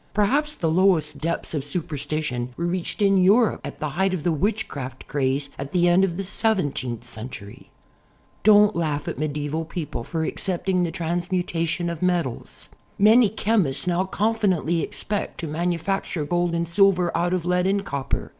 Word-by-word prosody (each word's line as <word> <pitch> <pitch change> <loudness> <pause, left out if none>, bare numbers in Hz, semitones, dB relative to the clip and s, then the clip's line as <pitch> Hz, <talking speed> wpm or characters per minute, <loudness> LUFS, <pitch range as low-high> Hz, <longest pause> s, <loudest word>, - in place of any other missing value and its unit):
Probably 280 +9 +2
the 165 - -1
lowest 165 -5 +2
depths 165 +3 -2
of 145 -3 -1
superstition 145 -5 -3
were 170 - -2
reached 180 +3 -2
in 195 -1 +4
Europe 205 +5 +4
at - - -7
the 150 - -2
height 190 +5 0
of 160 - -5
the 175 - +2
witchcraft 155 - -3
craze 140 0 -1
at 140 0 -6
the 175 -1 +3
end 175 +2 +5
of 175 -3 0
the 195 - -2
seventeenth 145 - -1
century. 110 -3 -9 0.7
Don't 210 0 +6
laugh 155 -3 -1
at - - -4
medieval 150 +1 -2
people 160 -7 -5
for 160 +5 -3
accepting 185 +2 -1
the 175 - 0
trans 170 +3 -3
mutation 175 -1 -1
of 170 -2 -4
metals. 175 -9 -2 0.3
Many 215 +2 +6
chemists 205 -10 0
now 180 +1 +1
confidently 190 -6 +1
ex - - -3
pect 205 0 -3
to 165 - -4
manufacture 170 +1 -2
gold 175 +1 0
and 170 0 -1
silver 180 0 +3
out 175 +1 +1
of 180 -2 -1
lead 180 +1 +2
and 200 +1 0
copper. 140 -5 -3
175 Hz, 170 wpm, -24 LUFS, 150-190 Hz, 0.7 s, Don't